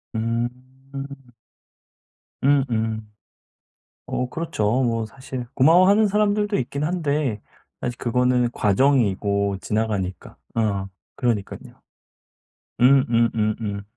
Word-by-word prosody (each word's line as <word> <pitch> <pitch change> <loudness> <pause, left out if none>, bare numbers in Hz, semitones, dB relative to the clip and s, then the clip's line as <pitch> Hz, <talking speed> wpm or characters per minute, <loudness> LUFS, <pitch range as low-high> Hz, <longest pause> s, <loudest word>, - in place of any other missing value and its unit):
음. 115 +2 0 1.9
음음. 115 -6 +1 1.0
어 125 - -2
그렇죠. 130 -7 -1
뭐 115 -2 0
사실 130 +1 -7
고마워하는 185 +9 +5
사람들도 205 0 +1
있긴 140 +3 -3
한데 150 - -1 0.4
사실 120 0 -3
그거는 125 0 +1
과정이고 100 -4 +1
지나가니까 105 -4 -2 0.2
어 100 -4 0 0.3
그러니깐요. 115 -6 -3 1.0
음음음음. 115 -5 +2
120 Hz, 200 characters per minute, -23 LUFS, 110-140 Hz, 1.9 s, 고마워하는